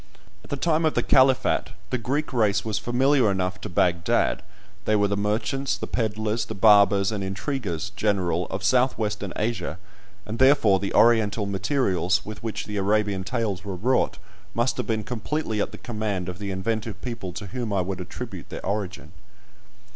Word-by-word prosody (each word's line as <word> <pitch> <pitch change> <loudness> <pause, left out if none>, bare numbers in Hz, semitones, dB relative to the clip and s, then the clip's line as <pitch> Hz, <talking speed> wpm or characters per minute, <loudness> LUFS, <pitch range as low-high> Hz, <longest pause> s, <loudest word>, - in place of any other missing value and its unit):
At - - -15
the - - -1
time 160 +2 +1
of 155 - +1
the - - +2
Caliphat 130 -4 +3 0.2
the 125 - 0
Greek 140 +6 -2
race 105 -4 +2
was 105 -1 -1
familiar 125 +1 +3
enough 90 -1 -1
to - - -5
Baghdad: 85 0 +1 0.4
they 110 - +3
were 105 -1 +3
the 100 - 0
merchants, 110 +7 -1
the - - -4
pedlars, 110 -1 -1
the 110 - -6
barbers, 100 -1 +5
and 105 -2 -3
intriguers 100 - -3
general 95 -5 0
of 95 0 -5
south 125 +6 +3
western 105 -3 -2
Asia, 105 -7 -2 0.5
and 110 +2 -5
therefore 130 -8 +5
the 100 - -3
Oriental 110 -2 +4
materials 100 - 0
with 105 -1 -7
which 110 -1 -4
the 105 -1 -5
Arabian 100 -1 +1
tales 105 -4 -2
were 100 -2 -4
wrought 110 +1 +1 0.4
must 120 +2 +1
have - - -3
been 110 -2 0
completely 120 0 -2
at - - -2
the - - -9
command 105 -6 -3
of 90 +1 -7
the 100 -1 -4
inventive 105 +2 -2
people 115 -7 -5
to 100 - -6
whom 115 +3 -4
I 100 -2 +2
would 90 0 -3
attribute 95 0 -7
their - - -7
origin. 95 -5 -3
105 Hz, 175 wpm, -25 LUFS, 95-120 Hz, 0.5 s, barbers